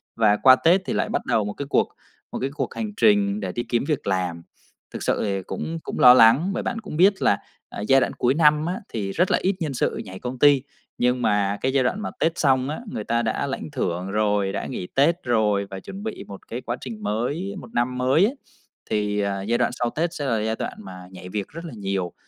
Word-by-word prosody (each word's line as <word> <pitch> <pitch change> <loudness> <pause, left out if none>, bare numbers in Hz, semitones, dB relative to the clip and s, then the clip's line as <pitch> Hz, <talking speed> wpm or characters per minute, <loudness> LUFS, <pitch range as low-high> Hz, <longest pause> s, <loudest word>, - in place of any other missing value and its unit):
và 105 -2 +3
qua 130 -1 +7
Tết 175 +7 +3
thì - - -2
lại - - 0
bắt - - -2
đầu 105 -2 +1
một 105 - -4
cái 140 - -5
cuộc - - +2 0.4
một - - -4
cái 135 - -1
cuộc - - -3
hành 220 -2 -3
trình 205 -1 +3
để - - -3
đi 120 - -3
kiếm 120 +1 +1
việc 150 -8 -2
làm. 90 -3 -1 0.5
Thực - - -5
sự - - 0
thì 100 -2 -1
cũng 165 - -5
cũng - - -5
lo 125 - +9
lắng, 125 +9 +6
bởi - - -3
bạn 235 - -2
cũng 200 -7 -7
biết 190 +3 +4
là, 100 - +3 0.3
à, - - -7
giai 135 +5 +4
đoạn - - 0
cuối 125 +2 +1
năm 150 0 +4
á 180 +2 -2
thì 100 -3 -3
rất 180 - +1
là - - +4
ít 190 +1 +1
nhân 155 -5 -2
sự - - -1
nhảy 95 0 -9
công 125 0 -6
ty, 145 -3 +6 0.4
nhưng 125 0 +1
mà 100 -1 +1
cái 130 +1 0
giai 135 -2 +3
đoạn 185 +12 -1
mà - - -4
Tết 165 - +2
xong 130 -2 +2
á, 150 - -4
người 105 - -4
ta 115 +2 0
đã 115 +5 -1
lãnh 140 +2 -5
thưởng 95 -7 -2
rồi, 105 -2 +1
đã - - -4
nghỉ 90 - -5
Tết 165 +6 +3
rồi 105 -5 +1
và 95 - -5
chuẩn 195 - -9
bị 220 -1 -5
một 100 -1 -11
cái 120 +3 -5
quá 120 +1 -4
trình 115 -4 -7
mới, 125 - -2
một 120 - -13
năm 125 +2 0
mới 130 +8 +3
á, 230 - +1 0.6
thì, 105 -1 0
à, 100 -1 -1
giai 115 +5 0
đoạn - - +1
sau 120 -1 +1
Tết 165 +5 -2
sẽ 145 - -4
là 115 -5 +1
giai 110 +1 -1
đoạn - - -4
mà 90 -1 -10
nhảy 90 0 -10
việc 100 0 -3
rất 165 +2 -9
là 160 - -8
nhiều. 95 -3 -2
125 Hz, 255 wpm, -23 LUFS, 105-150 Hz, 0.6 s, lo